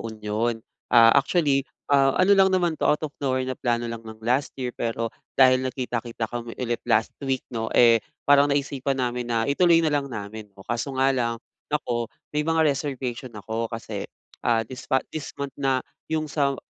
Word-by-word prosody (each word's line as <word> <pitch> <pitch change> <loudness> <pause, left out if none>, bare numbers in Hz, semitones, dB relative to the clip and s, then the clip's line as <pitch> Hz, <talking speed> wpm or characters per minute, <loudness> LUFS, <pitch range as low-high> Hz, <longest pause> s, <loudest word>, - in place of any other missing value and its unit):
Union. 110 +1 -2 0.3
Ah, 115 -1 +7
actually, 140 -1 +3 0.3
ah, 135 -1 +4
ano 185 +2 +5
lang 195 -1 +6
naman 180 -3 +2
'to, 155 - -1
out 150 - +2
of 150 - -5
nowhere 130 -2 0
na 130 - -2
plano 120 -1 -1
lang 115 -1 -5
nong 110 -1 -12
last 125 +4 +1
year, 125 -2 -3
pero 115 -1 -3 0.2
dahil 130 -1 +6
nagkita-kita 120 -3 -3
kami 120 -1 -5
ulit 120 -2 -2
last 110 0 +2
week, 135 -2 -2
'no, 115 -1 -2
eh, 115 -2 +6 0.2
parang 145 0 +5
naisipan 140 -1 -1
namin 125 -1 -2
na 115 -1 +1
ituloy 165 +3 +4
na 155 - +1
lang 140 -1 0
namin. 105 -2 -7 0.2
Kaso 120 +3 -3
nga 135 +1 +3
lang, 120 -3 0 0.3
ako, 120 -6 -1 0.2
may 150 - +1
mga 160 +1 +2
reservation 130 -4 -2
ako. 110 +2 -3
Kasi, 115 -1 -6 0.3
ah, 115 -1 +2
this 130 +5 -10
ma 130 -2 +2
this 155 -2 -6
month 140 -1 -4
na 135 -2 +1 0.2
'yong 160 -1 0
sa 140 -2 +1
130 Hz, 185 wpm, -25 LUFS, 115-140 Hz, 0.3 s, Ah